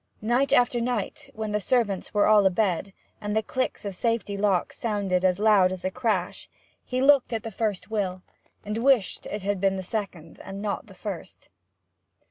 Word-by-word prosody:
Night 245 +5 +2
after 245 -1 +3
night, 250 +4 -3
when 215 -1 -3
the 210 - +1
servants 205 -3 0
were 205 - +3
all 210 -2 +6
abed, 190 0 0 0.3
and 210 0 -2
the 220 - +2
click 255 -1 -3
of 200 - -3
safety 230 0 -1
locks 200 -3 0
sounded 200 -5 0
as 185 -1 +3
loud 205 -3 +4
as 185 -1 -6
a 185 - 0
crash, 210 -6 -2 0.3
he 255 0 -1
looked 275 -2 +5
at 225 -2 -2
that 225 - -6
first 210 -1 -2
will, 185 -4 -2 0.4
and 210 +2 -2
wished 250 -5 +2
it 205 -2 -5
had 200 -1 -1
been 195 -1 +2
the 190 - -4
second 185 -5 -5
and 195 +1 -7
not 205 0 -3
the - - -14
first. - - -8
210 Hz, 185 wpm, -26 LUFS, 190-230 Hz, 0.4 s, all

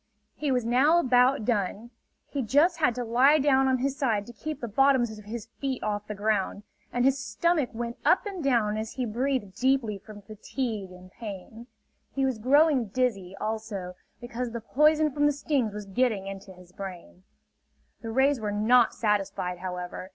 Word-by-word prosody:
He 295 -2 -2
was 250 -3 +1
now 265 +8 +4
about 250 -4 +3
done. 215 0 -1 0.4
He 280 - -3
just 300 - +3
had 250 -7 +2
to 250 - -3
lie 255 +6 +4
down 270 -2 +3
on 260 -1 +2
his 270 +2 -1
side 230 -8 0
to 240 - -11
keep 305 +8 -6
the 235 - -4
bottoms 245 0 +2
of 210 - -14
his 220 0 -6
feet 270 -2 -3
off 210 -1 -2
the 210 - -5
ground; 205 -1 -1 0.3
and 245 +1 +1
his 270 0 +3
stomach 295 +5 0
went 235 +1 -5
up - - +3
and 385 -5 -5
down 230 -6 +2
as 220 0 -4
he 255 - -2
breathed 240 -3 -2
deeply 250 -5 0
from 205 0 -13
fatigue 215 -1 -4
and 180 0 -14
pain. 220 +2 -9 0.5
He 270 -1 +1
was 260 -4 -1
growing 275 0 +4
dizzy, 195 -5 -1
also, 215 -4 -4 0.3
because 240 0 -4
the 235 0 -5
poison 305 +5 +3
from 290 +2 +2
the - - +3
stings 280 -5 -1
was 210 0 -7
getting 210 -1 0
into 195 0 -8
his 180 -1 -16
brain. 180 - -9 0.8
The 225 - -6
rays 265 +3 +2
were 210 -1 -2
not 230 +4 +3
satisfied, 195 -4 -1
however. 180 0 -6
235 Hz, 180 wpm, -27 LUFS, 205-270 Hz, 0.8 s, now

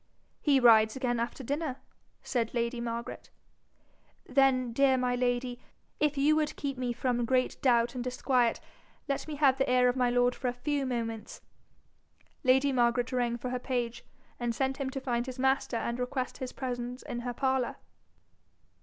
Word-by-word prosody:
'He 280 -3 +4
rides 220 -3 +6
again 245 -3 -1
after 235 +3 -3
dinner,' 285 +1 -2 0.5
said 235 -2 -1
lady 235 0 -1
Margaret. 235 0 -5 1.0
'Then, 255 -3 +2
dear 270 +1 +4
my 250 -1 +1
lady, 245 0 -1 0.4
if 295 -1 +1
you 295 +3 +4
would 305 -1 0
keep 275 -2 -3
me 250 -1 -2
from 240 0 -1
great 255 +2 0
doubt 240 -2 +3
and 250 -2 -4
disquiet, 250 -1 +1 0.5
let 275 +1 -2
me 305 - -4
have 275 -2 +3
the 270 - +1
ear 250 0 +5
of 245 - 0
my 250 -2 +2
lord 245 0 +3
for 255 - -4
a 245 - 0
few 275 +2 -2
moments.' 225 -3 -4 1.0
Lady 265 +2 +4
Margaret 240 -1 +2
rang 240 -2 0
for 250 +1 -5
her 250 - -2
page, 245 -2 -3 0.4
and 240 -1 -1
sent 265 +1 -1
him 270 -1 -2
to 270 - -4
find 245 -2 -2
his 255 0 -6
master 265 -2 +1
and 235 +1 -3
request 255 +1 -3
his 260 -2 -4
presence 245 -1 -5
in 240 - -5
her 245 0 -4
parlour. 260 -2 0
250 Hz, 170 wpm, -30 LUFS, 240-265 Hz, 1.0 s, rides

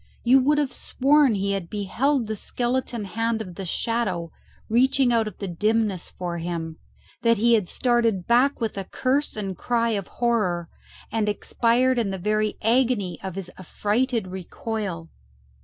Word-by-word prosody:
You 255 +3 +6
would 295 +3 +3
have 290 -3 0
sworn 275 -2 +3
he 200 0 0
had 195 -4 -3
beheld 235 +6 0
the 220 0 -3
skeleton 240 0 -2
hand 225 +4 -1
of 185 -5 -6
the 190 +2 -6
Shadow 185 -4 -2 0.4
reaching 255 +2 +3
out 225 -2 +2
of 215 - -7
the 200 - -5
dimness 210 +1 0
for 175 -1 -5
him; 165 -1 -4 0.4
that 230 -1 +3
he 235 +3 +4
had 210 -6 +3
started 230 -7 +1
back 250 +4 +3
with 220 -4 -2
a 195 - -5
curse 270 +8 0
and 195 -3 -3
cry 235 +4 0
of 200 -4 -2
horror, 210 -8 0 0.4
and 220 -2 0
expired 240 +4 +2
in 220 -4 0
the 190 - -3
very 215 +3 0
agony 230 -5 +1
of 190 -2 -5
his 190 -2 -6
affrighted 220 +5 0
recoil. 185 -2 -5
220 Hz, 160 wpm, -24 LUFS, 190-240 Hz, 0.4 s, You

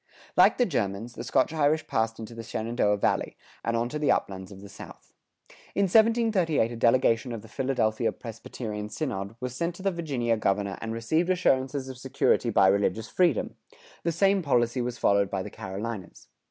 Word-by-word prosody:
Like - - +6
the 245 - +3
Germans, 115 - -2
the - - -7
Scotch 140 - +1
Irish 155 0 +2
passed 110 0 -1
into 115 +1 -8
the 115 - -7
Shenandoah 110 -2 0
Valley,[105:2] - - 0 0.3
and 115 0 +1
on 120 +1 0
to 150 - -4
the 150 - +3
uplands 95 -1 -2
of 95 - -11
the 100 - -10
South. 100 - -13 0.6
In 200 - +3
1738 210 - +3
a - - -5
delegation 115 +1 +2
of 115 -2 -6
the - - -12
Philadelphia 115 -2 0
Presbyterian 110 -2 -7
synod 100 -7 -4
was 125 -1 -5
sent 170 +4 -2
to 190 - -10
the 195 - +2
Virginia 135 -10 -1
governor 100 -1 -1
and 115 - -4
received 155 +10 0
assurances 135 -6 +1
of 130 -2 -8
security 130 -2 +1
of 115 - -5
religious 100 +3 +3
freedom; 175 - +1 0.5
the 170 - +1
same 195 +3 +3
policy 125 -4 +1
was 120 0 -3
followed 100 -2 +2
by 95 -1 -2
the - - -8
Carolinas. 100 0 -7
120 Hz, 180 wpm, -27 LUFS, 110-150 Hz, 0.6 s, Like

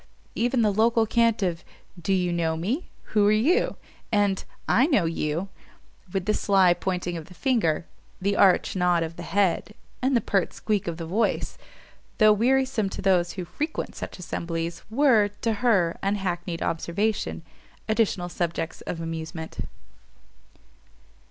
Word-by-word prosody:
Even 240 +1 +1
the 210 -2 +2
local 225 +2 +3
cant 230 -1 +2
of, 175 -2 -1 0.4
Do 185 - -1
you 180 -2 +1
know 165 -1 0
me? 230 - -2 0.2
Who 210 -1 +4
are - - +5
you? 290 - +2 0.4
and 205 -3 +2 0.2
I 255 +5 +4
know 240 - +3
you; 165 +3 -2 0.6
with 190 -1 -2
the 215 - +2
sly 190 -4 +4
pointing 175 -1 -3
of 160 - -8
the 180 - -14
finger, 170 - +1 0.3
the 200 +1 0
arch 195 -1 +4
nod 180 -2 +2
of 165 0 -5
the 175 - -8
head, 200 +3 0 0.3
and 260 0 +3
the - - +3
pert 195 -5 0
squeak 210 -4 -1
of 170 -1 -3
the 165 - -5
voice, 205 +8 0 0.6
though 215 -2 +6
wearisome 250 -1 +2
to - - -6
those 180 -3 +2
who 185 -2 -5
frequent 300 - -4
such - - -7
assemblies, 170 -1 -4
were, 230 -4 +4
to 230 - +1
her 195 -9 +2
unhackneyed 180 -4 -2
observation, 200 +6 -1 0.4
additional 215 -5 +1
subjects 170 -1 -3
of 165 - -3
amusement. 160 0 -6
195 Hz, 150 wpm, -25 LUFS, 170-220 Hz, 0.6 s, though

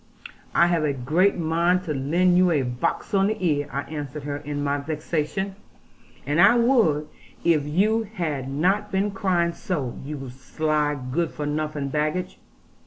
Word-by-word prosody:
'I 170 - +6
have 170 -2 +1
a 145 -2 +1
great 155 +11 +2
mind 170 +2 +1
to 160 -4 -3
lend 170 +7 +2
you 180 0 +5
a 150 -5 +2
box 125 +8 -2
on 195 0 +4
the 215 +1 -1
ear,' 145 -5 0
I 140 - -2
answered 150 -1 -6
her 145 0 -3
in 145 0 -4
my 145 0 0
vexation, 155 +5 -3 0.7
'and 145 +5 +2
I 240 - +7
would, 230 - +3 0.4
if 160 -4 +3
you 205 +9 +2
had 150 - -3
not 180 +9 +1
been 195 +2 0
crying 180 -5 +1
so, 145 -12 -4
you 140 -1 -6
sly 150 +3 -1
good 165 +3 0
for 150 - -5
nothing 150 -1 -2
baggage. 155 +5 -2
155 Hz, 165 wpm, -24 LUFS, 145-180 Hz, 0.7 s, I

